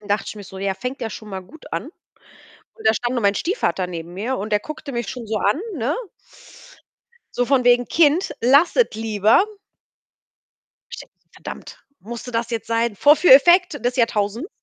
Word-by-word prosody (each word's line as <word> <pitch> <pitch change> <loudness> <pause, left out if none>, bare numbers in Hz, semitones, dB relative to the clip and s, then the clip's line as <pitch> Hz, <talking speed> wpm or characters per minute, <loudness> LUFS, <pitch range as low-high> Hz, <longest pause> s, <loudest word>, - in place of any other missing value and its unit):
Dann 210 - -15
dachte 205 +1 0
ich - - -7
mir 205 - -9
so: 190 - -11
„Ja, 195 0 -2
fängt 250 +6 -6
ja 225 -2 -4
schon 215 0 -9
mal 190 -1 -5
gut 295 - -16
an.“ - - -2 0.9
Und - - -3
da 220 - +5
stand 240 +3 -2
nur 245 - -1
mein 200 -1 +2
Stiefvater 330 - -1
neben 170 -1 -7
mir 230 +8 -3
und 210 +2 -5
der 210 - +3
guckte 305 +4 -8
mich 235 -4 -3
schon 245 -3 -7
so 215 0 -1
an, 205 +7 +1 0.2
ne? 270 +3 -1 1.4
So 245 - 0
von 260 -1 +2
wegen 245 0 +4
„Kind, 325 +3 +2
lass 280 +8 +4
es - - +6
lieber.“ 220 - +2 1.5
Ich - - -8
denke - - -14
so: - - -44
„Verdammt, - - -10 0.2
musste 235 +3 -8
das 230 0 -2
jetzt 225 -2 -4
sein?“ 230 -1 0
Vorführeffekt 310 - +5
des 245 +1 0
Jahrtausends. 230 - 0
235 Hz, 190 wpm, -21 LUFS, 210-275 Hz, 1.5 s, es